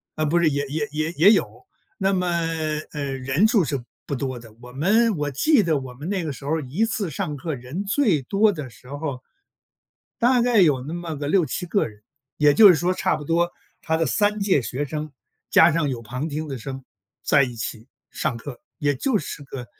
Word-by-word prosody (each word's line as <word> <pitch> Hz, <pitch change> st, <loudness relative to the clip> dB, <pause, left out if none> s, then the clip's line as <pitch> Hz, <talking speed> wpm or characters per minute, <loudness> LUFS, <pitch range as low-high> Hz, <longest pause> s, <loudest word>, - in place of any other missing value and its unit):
啊， 155 Hz, -, 0 dB
不 165 Hz, +3 st, +2 dB
是， 170 Hz, -2 st, +4 dB
也 145 Hz, 0 st, -1 dB
也 150 Hz, +1 st, -2 dB
也 155 Hz, +2 st, -1 dB
也 180 Hz, +6 st, +6 dB
有， 225 Hz, -, 0 dB, 0.3 s
那 195 Hz, -1 st, +1 dB
么， 180 Hz, -1 st, 0 dB, 0.6 s
呃， 150 Hz, -2 st, -4 dB
人 135 Hz, +9 st, +2 dB
数 220 Hz, -4 st, +3 dB
是 135 Hz, -2 st, -3 dB, 0.2 s
不 140 Hz, -, -3 dB
多 130 Hz, -1 st, -3 dB
的。 115 Hz, -2 st, -14 dB
我 125 Hz, 0 st, -11 dB
们 205 Hz, -, +2 dB
我 145 Hz, -1 st, -2 dB
记 280 Hz, -, +3 dB
得 160 Hz, -5 st, +1 dB
我 130 Hz, -2 st, -8 dB
们 145 Hz, +6 st, -8 dB
那 195 Hz, -3 st, -1 dB
个 155 Hz, -, -3 dB
时 135 Hz, -, -11 dB
候 145 Hz, -, -2 dB
儿 -, -, -3 dB
一 150 Hz, -, 0 dB
次 210 Hz, -5 st, -2 dB
上 150 Hz, -1 st, -3 dB
课 155 Hz, +2 st, -4 dB
人 130 Hz, +10 st, -5 dB
最 200 Hz, -, +2 dB
多 205 Hz, -, +3 dB
的 150 Hz, -8 st, -6 dB
时 120 Hz, +2 st, -18 dB
候 145 Hz, -1 st, -4 dB
儿 125 Hz, -, -14 dB, 1.0 s
大 245 Hz, +1 st, +4 dB
概 240 Hz, -3 st, +4 dB
有 150 Hz, -8 st, +4 dB
那 150 Hz, +6 st, -6 dB
么 175 Hz, -2 st, -5 dB
个 145 Hz, 0 st, -4 dB
6-7 180 Hz, 0 st, +1 dB
个 200 Hz, +3 st, +1 dB
人， 105 Hz, -1 st, -18 dB, 0.3 s
也 150 Hz, -1 st, +4 dB
就 215 Hz, -3 st, +9 dB
是 180 Hz, -, +7 dB
说 175 Hz, +4 st, +1 dB
差 165 Hz, -, 0 dB
不 150 Hz, -, -8 dB
多 170 Hz, +2 st, +1 dB, 0.3 s
他 160 Hz, 0 st, 0 dB
的 165 Hz, -, +1 dB
3 210 Hz, 0 st, +1 dB
届 190 Hz, -10 st, +2 dB
学 130 Hz, +7 st, -3 dB
生 150 Hz, +1 st, -5 dB, 0.4 s
加 165 Hz, +1 st, +6 dB
上 160 Hz, -2 st, +1 dB
有 125 Hz, -3 st, -4 dB
旁 125 Hz, +7 st, -4 dB
听 155 Hz, +1 st, -4 dB
的 135 Hz, -2 st, -5 dB
生 135 Hz, +3 st, -7 dB, 0.4 s
在 145 Hz, -, +4 dB
一 125 Hz, -3 st, -2 dB
起 115 Hz, 0 st, -6 dB, 0.2 s
上 120 Hz, -, -2 dB
课， 120 Hz, +1 st, -9 dB, 0.2 s
也 145 Hz, -3 st, +1 dB
就 220 Hz, -, 0 dB
是 150 Hz, -, -7 dB
个 135 Hz, -3 st, -8 dB
150 Hz, 230 characters per minute, -23 LUFS, 135-185 Hz, 1.0 s, 就